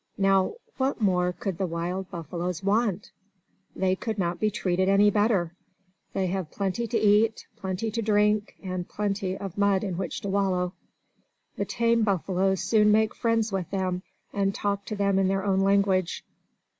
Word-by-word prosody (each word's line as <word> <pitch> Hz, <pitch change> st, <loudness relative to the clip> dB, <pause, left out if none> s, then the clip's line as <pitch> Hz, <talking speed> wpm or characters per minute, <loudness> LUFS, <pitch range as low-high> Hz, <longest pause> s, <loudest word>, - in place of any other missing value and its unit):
Now, 195 Hz, -, +2 dB, 0.2 s
what 265 Hz, 0 st, 0 dB
more 180 Hz, -4 st, +2 dB
could 185 Hz, 0 st, -5 dB
the 190 Hz, -, 0 dB
wild 175 Hz, +3 st, -3 dB
buffaloes 175 Hz, +1 st, -4 dB
want? 205 Hz, -1 st, 0 dB, 0.6 s
They 185 Hz, 0 st, +1 dB
could 220 Hz, +2 st, -4 dB
not 175 Hz, -2 st, -1 dB
be 215 Hz, -, +2 dB
treated 185 Hz, -2 st, 0 dB
any 205 Hz, +1 st, +5 dB
better! 205 Hz, -5 st, +1 dB, 0.6 s
They 190 Hz, -, 0 dB
have 185 Hz, -3 st, -2 dB
plenty 200 Hz, +6 st, -2 dB
to 230 Hz, -, 0 dB
eat, 215 Hz, +2 st, +3 dB
plenty 190 Hz, +3 st, -3 dB
to 230 Hz, +1 st, -2 dB
drink, 210 Hz, -1 st, +2 dB
and 185 Hz, -2 st, -4 dB
plenty 195 Hz, -2 st, -2 dB
of 195 Hz, -1 st, -6 dB
mud 200 Hz, -1 st, +3 dB
in 185 Hz, -4 st, -3 dB
which 190 Hz, -, -4 dB
to -, -, -5 dB
wallow. 190 Hz, -2 st, 0 dB, 0.8 s
The -, -, -2 dB
tame 235 Hz, 0 st, +1 dB
buffaloes 190 Hz, -2 st, +1 dB
soon 210 Hz, -2 st, +4 dB
make 220 Hz, 0 st, +3 dB
friends 230 Hz, -2 st, 0 dB
with 190 Hz, -4 st, -2 dB
them, 185 Hz, -2 st, -1 dB, 0.3 s
and 195 Hz, -1 st, 0 dB
talk 200 Hz, -1 st, -2 dB
to 215 Hz, -, -4 dB
them 200 Hz, -1 st, +2 dB
in 190 Hz, -, +3 dB
their 195 Hz, +1 st, 0 dB
own 195 Hz, -1 st, +2 dB
language. 195 Hz, -2 st, +2 dB
195 Hz, 170 wpm, -26 LUFS, 185-210 Hz, 0.8 s, any